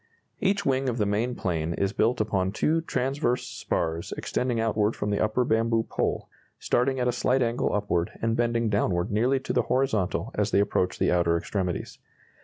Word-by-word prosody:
Each 200 Hz, 0 st, +1 dB
wing 135 Hz, 0 st, +1 dB
of 120 Hz, -, -2 dB
the 105 Hz, -, +1 dB
main 110 Hz, +5 st, 0 dB
plane 85 Hz, -4 st, -2 dB
is 100 Hz, +3 st, -1 dB
built 115 Hz, +3 st, +1 dB
upon 100 Hz, -3 st, 0 dB
2 160 Hz, +8 st, +1 dB
transverse 130 Hz, -1 st, 0 dB
spars 80 Hz, 0 st, -3 dB
extending 125 Hz, -2 st, -1 dB
outward 110 Hz, -1 st, +1 dB
from 105 Hz, 0 st, -2 dB
the 100 Hz, -, 0 dB
upper 110 Hz, +4 st, +1 dB
bamboo 115 Hz, 0 st, +2 dB
pole, -, -, -2 dB, 0.3 s
starting 130 Hz, +2 st, +1 dB
at 125 Hz, -, +1 dB
a -, -, +3 dB
slight 125 Hz, +2 st, +1 dB
angle 120 Hz, +1 st, 0 dB
upward 95 Hz, -4 st, 0 dB
and 115 Hz, 0 st, 0 dB
bending 115 Hz, -1 st, +1 dB
downward 100 Hz, -4 st, 0 dB
nearly 125 Hz, +6 st, +2 dB
to -, -, -3 dB
the -, -, +3 dB
horizontal 125 Hz, -8 st, 0 dB
as -, -, 0 dB
they -, -, +3 dB
approach 95 Hz, -2 st, +1 dB
the -, -, +2 dB
outer 85 Hz, -1 st, +2 dB
extremities. 90 Hz, 0 st, -3 dB
115 Hz, 185 wpm, -26 LUFS, 100-125 Hz, 0.3 s, a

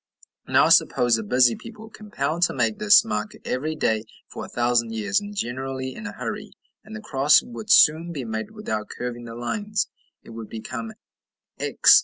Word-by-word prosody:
Now -, -, +4 dB
suppose 120 Hz, -2 st, +4 dB
a -, -, -4 dB
busy 120 Hz, +2 st, +3 dB
people 220 Hz, -1 st, -11 dB
compelled 170 Hz, -7 st, -4 dB
to -, -, -7 dB
make 215 Hz, -, 0 dB
this 210 Hz, +1 st, +6 dB
mark 225 Hz, -1 st, -3 dB
every 155 Hz, +5 st, -2 dB
day 110 Hz, -7 st, 0 dB, 0.3 s
for -, -, -7 dB
a -, -, -7 dB
thousand 120 Hz, -1 st, +1 dB
years, 105 Hz, -3 st, 0 dB
and 205 Hz, 0 st, -8 dB
generally 130 Hz, -3 st, -4 dB
in 230 Hz, -, -7 dB
a -, -, -6 dB
hurry, -, -, -6 dB, 0.3 s
and 215 Hz, +1 st, -10 dB
the 215 Hz, -, -7 dB
cross 145 Hz, -4 st, +4 dB
would 230 Hz, -3 st, -9 dB
soon 165 Hz, -4 st, +5 dB
be 145 Hz, -6 st, -5 dB
made 110 Hz, -1 st, -4 dB
without 110 Hz, -, -5 dB
curving 120 Hz, -1 st, -6 dB
the 115 Hz, 0 st, -8 dB
lines; 205 Hz, -, -2 dB, 0.3 s
it -, -, -13 dB
would 115 Hz, -1 st, -8 dB
become 115 Hz, 0 st, -6 dB, 0.7 s
X. -, -, +6 dB
135 Hz, 180 wpm, -24 LUFS, -, 0.7 s, this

